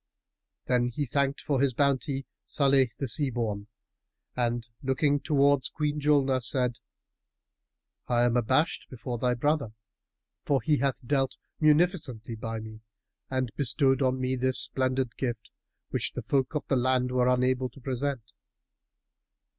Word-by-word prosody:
Then 125 -1 +2
he 135 +4 -2
thanked 140 +2 0
for 140 -3 0
his 135 -3 +2
bounty 140 0 +1 0.2
Salih 135 -3 +3
the 135 - -2
Sea 135 +4 0
born 110 -4 -3 0.7
and, 120 -1 -1
looking 140 +2 +1
towards 140 -1 +2
Queen 150 -1 -2
Julnar, 140 -3 +3
said, 125 -1 -1 1.3
"I 120 0 +2
am 120 0 +2
abashed 130 +7 +1
before 125 -1 -5
thy 125 +1 +1
brother, 140 -3 0 0.7
for 140 -2 +2
that - - -25
he 150 -1 +3
hath 135 -1 -1
dealt 135 0 0 0.2
munificently 150 - +2
by 115 0 -4
me 110 0 -10 0.5
and 130 -3 -1
bestowed 135 0 +2
on 130 -1 +1
me 130 0 0
this 130 0 0
splendid 130 -1 -1
gift, 120 -4 -3 0.4
which - - -2
the - - -5
folk 135 +1 0
of 150 - -1
the 135 - +2
land 125 0 +1
were 125 -1 +2
unable 125 0 +2
to 135 - -15
present." 130 -2 -3
130 Hz, 145 wpm, -28 LUFS, 125-140 Hz, 1.3 s, Salih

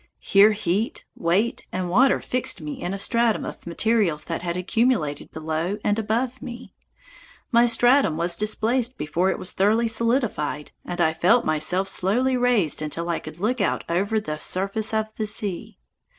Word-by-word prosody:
Here 205 +2 +4
heat, 205 +2 -2
weight, 190 +8 0
and 185 -1 -3
water 245 +9 +3
fixed 255 -3 -1
me 150 -2 -7
in 175 - -3
a 195 - -3
stratum 230 +2 +2
of - - -9
materials 185 -3 +1
that 165 - -4
had 175 0 -3
accumulated 185 - 0
below 160 +5 -3
and 205 +1 +1
above 235 +4 -2
me. 240 +1 -9 0.8
My 235 0 +5
stratum 240 - +4
was 170 +1 +2
displaced 230 +5 0
before 165 +5 0
it - - -1
was 185 - -5
thoroughly 220 +4 +2
solidified, 225 - 0
and 175 0 -6
I 160 -2 +3
felt 180 +9 +3
myself 155 +5 0
slowly 235 +8 +1
raised 245 - +1
until 165 +3 -4
I 170 - -1
could 155 0 -10
look 220 +6 -1
out 195 - 0
over 200 +6 0
the 155 -7 -5
surface 195 +6 -1
of 220 0 -2
the 215 - -2
sea. 205 -3 -3
200 Hz, 165 wpm, -23 LUFS, 170-230 Hz, 0.8 s, My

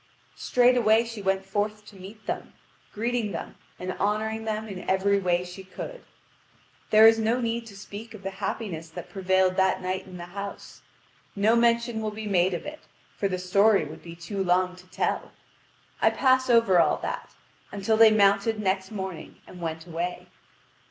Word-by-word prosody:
Straightway 240 -2 +3
she 230 -2 -7
went 190 0 0
forth 210 +2 -2
to 210 - -14
meet 200 +3 -12
them, - - -4 0.4
greeting 230 -2 -2
them 165 - -6 0.2
and 185 +1 -4
honouring 220 +2 -1
them 220 0 -2
in 190 -3 -7
every 200 +1 +3
way 180 -2 +1
she 180 +2 -9
could. - - -8 0.9
There 215 +1 +7
is 225 0 +7
no 225 +3 +1
need 230 -1 -2
to 200 -3 -12
speak 205 +3 -9
of 200 - -12
the 195 - -3
happiness 190 -5 -4
that 170 +1 -9
prevailed 190 -1 +2
that 190 -1 +3
night 185 +1 -3
in 185 -1 -9
the 175 - -7
house. 200 0 -7 0.5
No 210 +3 +3
mention 235 -1 +2
will 215 - -1
be 215 +1 -7
made 185 -2 +2
of - - -6
it, 300 +1 -7 0.4
for 200 - 0
the 185 -1 -2
story 200 +2 +3
would 150 - -10
be 170 -1 -10
too 195 +4 -4
long 180 0 +2
to 180 0 -16
tell. - - -2 0.7
I - - +6
pass 260 -1 +2
over 230 -6 +5
all - - +3
that, - - -5 0.4
until 205 +2 0
they 225 0 +8
mounted 205 +1 +3
next 190 -2 0
morning 190 -5 -6
and 180 - -12
went 160 -1 -4
away. 175 +1 -4
200 Hz, 180 wpm, -26 LUFS, 185-220 Hz, 0.9 s, they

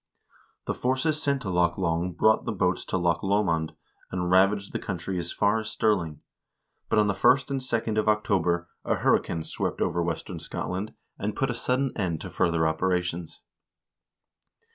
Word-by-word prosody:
The - - -1
forces 140 +5 0
sent 140 -3 0
into 95 - -2
Loch 85 -1 +2
Long 85 -1 0
brought 110 +6 +3
boats 90 -3 0
to - - -1
Loch 85 -2 +1
Lomond, 95 -6 +1 0.3
and 90 -1 -2
ravaged 100 +2 +3
the - - -1
country 90 0 -3
as 85 0 -3
far 105 +2 +2
as 110 -1 -4
Stirling; 85 -9 0 0.7
but 110 - +2
on 105 - +5
the 100 - +1
1st 130 +8 +3
and 135 - 0
2d 115 -4 -1
of 110 - +2
October 90 -5 +1 0.2
a - - +1
hurri - - +3
cane 80 -1 -4
swept - - -3
over 85 - 0
western 85 -1 -3
Scotland, 95 +4 -4 0.2
and 105 +1 -2
put 135 -2 0
a - - -2
sudden 130 +2 0
end 85 -6 -1
to - - -7
further 80 -1 +2
operations. 85 0 -1
95 Hz, 170 wpm, -27 LUFS, 85-110 Hz, 0.7 s, on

